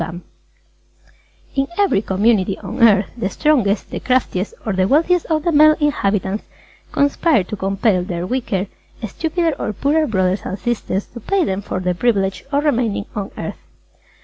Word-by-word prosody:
"_ 170 Hz, +2 st, -5 dB, 1.3 s
In 270 Hz, 0 st, 0 dB
every 395 Hz, -, +3 dB
community 200 Hz, -1 st, +1 dB
on 240 Hz, +2 st, -6 dB
Earth, 210 Hz, -4 st, +5 dB
the 230 Hz, -5 st, -2 dB
strongest, 230 Hz, -8 st, +1 dB
the -, -, -3 dB
craftiest 245 Hz, -7 st, 0 dB
or 215 Hz, -, -1 dB
the 185 Hz, 0 st, +2 dB
wealthiest 335 Hz, -, +2 dB
of 310 Hz, -2 st, 0 dB
the 340 Hz, -, +1 dB
male 305 Hz, 0 st, +6 dB
inhabitants 205 Hz, -8 st, 0 dB, 0.5 s
conspire 285 Hz, -, +2 dB
to 195 Hz, -, -6 dB
compel 195 Hz, 0 st, +1 dB
their 175 Hz, -2 st, -4 dB
weaker, 205 Hz, -4 st, -1 dB, 0.4 s
stupider 325 Hz, -, -1 dB
or 215 Hz, -, -2 dB
poorer 300 Hz, +8 st, +1 dB
brothers 190 Hz, -2 st, 0 dB
and 190 Hz, -, -4 dB
sisters 215 Hz, -4 st, -2 dB
to 240 Hz, -, -11 dB
pay 390 Hz, -, 0 dB
them 190 Hz, +1 st, -2 dB
for 190 Hz, -, -4 dB
the 180 Hz, -1 st, 0 dB
privilege 195 Hz, -1 st, 0 dB
of 285 Hz, +1 st, +1 dB
remaining 235 Hz, -8 st, 0 dB
on 200 Hz, -2 st, -3 dB
earth. -, -, -5 dB
215 Hz, 160 wpm, -19 LUFS, 195-285 Hz, 1.3 s, male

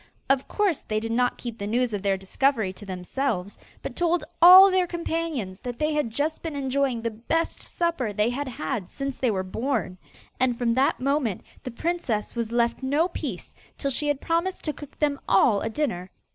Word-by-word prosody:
Of 270 Hz, -1 st, +1 dB
course 400 Hz, -7 st, +1 dB
they 215 Hz, 0 st, -2 dB
did 225 Hz, +1 st, -4 dB
not 245 Hz, +1 st, +1 dB
keep 235 Hz, -2 st, -7 dB
the 200 Hz, -, -3 dB
news 240 Hz, +1 st, +1 dB
of 205 Hz, -, -2 dB
their 195 Hz, -1 st, +1 dB
discovery 215 Hz, +1 st, 0 dB
to 205 Hz, +2 st, -12 dB
themselves, 190 Hz, +2 st, -3 dB, 0.2 s
but -, -, -5 dB
told 345 Hz, -2 st, +1 dB, 0.2 s
all 375 Hz, +3 st, +10 dB
their 370 Hz, -1 st, +2 dB
companions 325 Hz, -, -3 dB
that 245 Hz, -1 st, -6 dB
they 305 Hz, +3 st, 0 dB
had 295 Hz, -5 st, 0 dB
just 290 Hz, +7 st, -2 dB
been 325 Hz, -3 st, -5 dB
enjoying 270 Hz, -3 st, 0 dB
the 230 Hz, -, -1 dB
best 240 Hz, +10 st, -1 dB
supper 335 Hz, -10 st, -1 dB
they 210 Hz, +3 st, +1 dB
had 280 Hz, +3 st, -3 dB
had 255 Hz, -6 st, -4 dB
since 275 Hz, -1 st, -5 dB
they 255 Hz, -, +2 dB
were 190 Hz, -3 st, 0 dB
born. 220 Hz, -2 st, -2 dB, 0.4 s
And 250 Hz, -2 st, +2 dB
from 235 Hz, -2 st, +1 dB
that 265 Hz, +3 st, +2 dB
moment 270 Hz, -6 st, 0 dB, 0.2 s
the -, -, -6 dB
princess 250 Hz, -5 st, -2 dB
was 230 Hz, -1 st, -2 dB
left 235 Hz, +1 st, +1 dB
no 290 Hz, +6 st, +1 dB
peace, -, -, -6 dB, 0.2 s
till 275 Hz, -, -1 dB
she 295 Hz, +3 st, -1 dB
had 290 Hz, -2 st, +1 dB
promised 340 Hz, +3 st, -1 dB
to 305 Hz, -, -1 dB
cook 290 Hz, -1 st, -12 dB
them 290 Hz, -2 st, 0 dB
all 200 Hz, +1 st, +4 dB
a 225 Hz, -, -2 dB
dinner. 220 Hz, -9 st, -2 dB
255 Hz, 200 wpm, -25 LUFS, 220-300 Hz, 0.4 s, all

